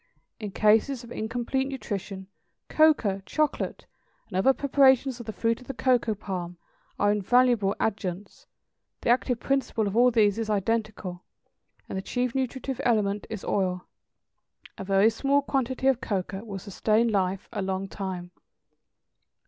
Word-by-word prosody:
In 210 -2 -4
cases 220 +6 +2
of 235 - -12
incomplete 240 +4 -2
nutrition, 200 -7 -5 0.4
cocoa, 265 -11 +3
chocolate, 305 -1 -1 0.4
and 190 - -9
other 190 +8 +5
preparations 265 -2 +3
of 235 - -9
the - - -2
fruit 230 +2 -1
of 250 - -15
the 270 - -5
cocoa 245 -4 +2
palm, 180 -4 -5 0.4
are 205 0 +3
invaluable 210 0 +3
adjuncts; 195 -2 -3 0.5
the - - +2
active 245 -1 +1
principle 270 -5 0
of 200 0 -2
all 245 +2 +6
these 215 -3 +3
is 225 -1 -3
identical, 210 -3 -2 0.6
and 190 - -4
the - - -4
chief 245 +4 -2
nutritive 265 0 -3
element 210 -4 +1
is 220 -3 -6
oil. 180 -2 -1 0.9
A - - -7
very 195 +3 +4
small 275 +5 +1
quantity 260 -2 -1
of 265 -2 +3
cocoa 195 0 -3
will 205 -4 -6
sustain 215 +4 +1
life 195 -2 -1
a - - -2
long 190 0 -2
time. 185 -3 -6
220 Hz, 145 wpm, -27 LUFS, 195-250 Hz, 0.9 s, all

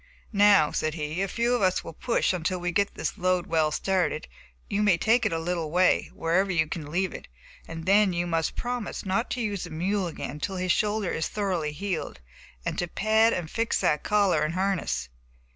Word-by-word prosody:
"Now," 200 -6 +5
said 155 0 -1
he, 155 +2 -3
"a 195 - 0
few 235 +5 0
of 245 - +1
us 185 -1 +2
will - - -8
push 230 +3 0
until 180 +1 -1
we 175 0 -2
get 200 +3 0
this - - -3
load 185 -1 +1
well 160 -2 +2
started, 180 0 0
and - - -27 0.5
you - - +2
may 205 -5 +4
take 225 +5 +3
it - - -4
a 165 - 0
little 165 -1 -2
way, 180 +3 +3
wherever 175 +4 +1
you 165 -3 +2
can 155 -1 -6
leave 185 +3 -1
it, - - -9 0.4
and 165 0 -7
then 200 +1 +4
you 175 0 -1
must 165 -2 -1
promise 245 -4 -4
not 195 +5 0
to 245 - -2
use 205 -5 -2
the - - -9
mule 185 +4 -1
again 165 - -5
until 150 +7 -4
his 185 0 0
shoulder 210 -2 0
is 160 - -1
thoroughly 185 -7 -2
healed, 175 - -4 0.5
and - - -2
to 175 - -1
pad 220 +5 +3
and 165 -6 -3
fix 230 0 0
that 150 - +2
collar 200 -7 +2
and 155 +2 -1
harness." 185 - -1
185 Hz, 210 wpm, -26 LUFS, 165-205 Hz, 0.5 s, Now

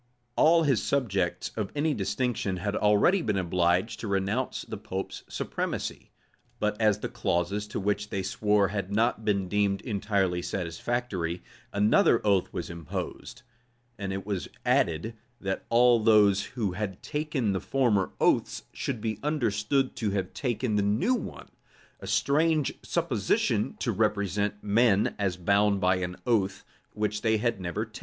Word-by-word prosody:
All 165 +1 +5
his 135 -7 +2
subjects 100 -10 -1
of 105 -3 -3
any 150 +1 +1
distinction 105 -2 -1
had 100 +3 -2
already 105 - +4
been 105 -9 0
obliged 90 +2 +1
to 110 - -5
renounce 100 +6 -1
the - - -6
pope's 95 -2 -5
supremacy; - - -4 0.5
but 105 0 0
as 105 -1 +3
the - - -2
clauses 105 -3 -1
to - - -4
which 105 +1 -1
they 95 -1 -2
swore 105 0 +2
had 100 -2 -3
not 110 +1 +1
been 100 -3 0
deemed 100 0 +1
entirely 100 -5 0
satisfactory, 90 0 -3 0.3
another 105 +3 +4
oath 100 -3 +2
was - - -4
imposed; 85 - -6 0.6
and 100 -1 -3
it 95 0 -4
was 100 -4 -3 0.2
added, 85 +8 +1 0.3
that 95 -1 -3
all 120 0 +5
those 105 -3 +5
who 105 -6 0
had 95 0 -5
taken 150 -8 -1
the 95 - -2
former 115 -8 +1
oaths - - +2
should 125 -6 -3
be 110 -2 -2
understood 130 -2 0
to 110 - 0
have 95 -2 -2
taken 120 -4 -1
the - - +3
new 105 - +2
one;[] 250 - -5 0.5
a - - -9
strange 155 0 +2
supposition - - 0
to - - -1
represent 105 0 0
men 105 -1 +3
as 95 -3 0
bound 100 +2 +2
by 95 0 +3
an 90 -1 -3
oath 100 -6 0 0.3
which 105 0 -2
they 110 -1 +2
had 115 -2 -1
never 95 +5 -2
taken. 110 -1 -11
105 Hz, 150 wpm, -28 LUFS, 95-115 Hz, 0.6 s, All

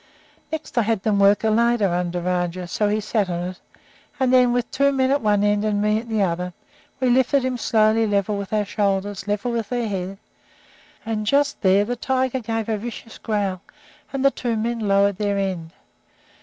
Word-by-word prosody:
Next 315 -5 -3
I - - +5
had 220 -3 -1
them 210 -2 +1
work 200 +2 +4
a 220 - +2
ladder 230 -2 +3
under 175 0 -1
Rajah, 180 0 -2
so 210 +4 0
that 205 - +1
he - - 0
sat 210 -2 -1
on 175 +1 -2
it; 185 - -10 0.6
and 260 -1 +2
then, 250 -1 +5
with 245 0 -1
two 280 +1 +2
men 265 -1 +1
at 280 - +2
one 205 -2 +2
end 205 0 +2
and 210 -1 0
me 210 +1 +2
at 235 +1 -10
the 220 -2 +1
other, 180 0 -2 0.5
we 255 - +1
lifted 260 +1 +3
him 260 -1 -1
slowly 220 -1 +2
level 205 0 0
with 200 -1 -5
our 210 -1 +1
shoulders, 200 -1 -1
level 205 +4 -1
with 230 -1 -3
our 245 -1 0
heads, 195 -2 -4 0.9
and 215 -1 -3
just 285 +4 +1
there 195 +1 +4
the 245 +3 -2
tiger 260 +1 -1
gave 225 -2 -3
a 220 -2 -1
vicious 230 0 -8
growl, 200 -4 -2 0.5
and 275 0 -2
the 275 - +6
two 235 -4 -2
men 230 +2 -2
lowered 200 -2 +2
their 205 -1 0
end. 185 -4 -2
215 Hz, 205 wpm, -22 LUFS, 200-240 Hz, 0.9 s, the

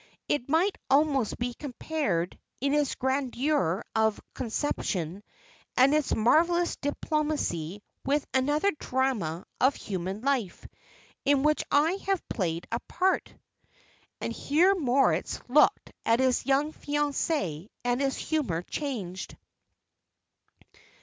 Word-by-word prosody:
It 280 -3 -1
might 345 +6 +2
almost 275 -5 +3
be 245 0 -2
compared, 250 - -2 0.2
in 275 +2 +1
its 295 -2 +1
grandeur 260 - 0
of 220 -1 +2
conception, 205 - -2 0.6
and 265 +3 +6
its 305 -2 +2
marvellous 340 +9 +3
diplomacy, 285 - -2 0.2
with 285 +1 +1
another 290 +9 +2
drama 235 -11 -1
of 265 +2 +4
human 190 +1 -4
life, 255 -9 -1 0.6
in 280 0 +3
which 305 0 +3
I 320 +7 +3
have 390 -3 0
played 170 -5 -2
a 230 - 0
part." 375 +1 +1 0.9
And - - -3
here 345 +7 +3
Moritz 275 -7 +1
looked 275 +5 +4
at 230 +1 +3
his 260 -1 +2
young 285 +3 +2
fiancée, 290 - -1 0.2
and 245 +2 +1
his 270 -1 0
humour 255 - -1
changed. 200 - -5
270 Hz, 110 wpm, -28 LUFS, 220-300 Hz, 0.9 s, and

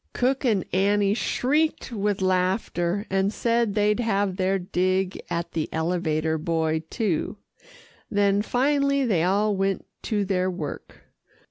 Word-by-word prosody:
Cook 260 +3 0
and 215 -8 +1
Annie 200 +1 +3
shrieked 270 +9 0
with 205 -3 -1
laughter, 185 0 0
and 195 +1 +2
said 230 -2 0
they'd 210 +1 +2
have 200 -5 0
their 190 0 +1
dig 185 +1 -1
at 170 0 -3
the 160 -2 -2
elevator 160 -1 0
boy 160 -1 0
too, 210 -4 -1 0.7
then 200 0 +2
finally 280 +3 +1
they 195 -9 +2
all 200 +4 +2
went 195 0 -1 0.2
to 205 -3 0
their 185 -1 0
work. 160 -6 -6
195 Hz, 130 wpm, -25 LUFS, 180-215 Hz, 0.7 s, Annie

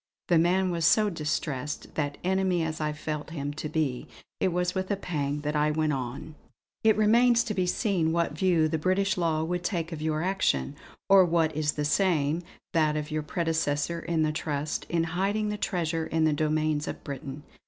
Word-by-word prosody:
The 170 -2 +5
man 185 +2 +2
was 170 -1 -2
so 210 +5 +4
distressed 150 -3 -3
that, 145 -2 -2
enemy 185 -2 +1
as 160 -1 -3
I 150 0 0
felt 150 0 -5
him 145 -3 -4
to 150 +1 -5
be, 145 -6 -1 0.3
it - - +2
was 180 0 0
with 190 -1 -2
a 200 - +1
pang 150 -6 -3
that 150 +1 -2
I 150 0 +3
went 155 0 +1
on: 130 +4 -5 0.5
"It 220 -1 +4
remains 235 +3 +4
to 215 - -3
be 185 -2 0
seen 180 -5 +1
what 170 -2 +1
view 165 -2 +3
the 160 0 -1
British 185 +4 +1
law 160 -3 0
would 175 +2 -2
take 175 -3 -2
of 160 -2 -5
your 155 0 -1
action, 175 - 0 0.3
or 195 -1 +7
what 165 -3 +1
is 150 -1 +1
the 150 - -2
same, 160 -2 +2 0.3
that 155 -2 +2
of 150 0 -4
your 155 0 -1
predecessor 160 0 -1
in 165 -1 0
the 155 - +1
trust, 150 -1 -3
in 170 -1 +1
hiding 195 +6 -1
the 210 - -2
treasure 165 -5 -1
in 160 0 0
the 155 -1 +3
domains 155 0 0
of - - -6
Britain. 140 0 -7
160 Hz, 195 wpm, -27 LUFS, 150-180 Hz, 0.5 s, or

